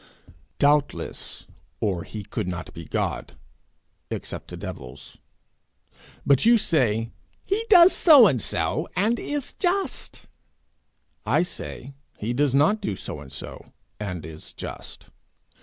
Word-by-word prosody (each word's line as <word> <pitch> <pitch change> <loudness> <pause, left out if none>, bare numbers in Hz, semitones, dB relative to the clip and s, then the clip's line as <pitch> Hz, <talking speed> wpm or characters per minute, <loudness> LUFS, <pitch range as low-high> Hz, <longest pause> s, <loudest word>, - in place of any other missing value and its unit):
'Doubtless, 145 0 0 0.3
or 95 -6 0
he 105 +3 -7
could 90 - -4
not 90 -1 -5
be 85 -1 -9
God - - -3 0.7
except - - -5
to - - -8
devils. 65 +2 -9 1.1
But 140 -2 +4
you 235 +1 +6
say 115 - +1 0.3
he 400 +4 0
does 360 -3 +8
so 295 -8 +8
and 135 - +3
so, 85 - -1
and 220 +5 +1
is 290 -2 -3
just; 380 +2 -2 1.0
I - - +2
say, 140 -6 -7 0.2
he 115 +3 -2
does 135 +1 +2
not 160 +10 +3
do 105 - -2
so 75 - -6
and 70 -2 -12
so, - - -7 0.4
and 90 -7 -5
is 80 -1 -8
just. - - -8
135 Hz, 125 wpm, -25 LUFS, -, 1.1 s, does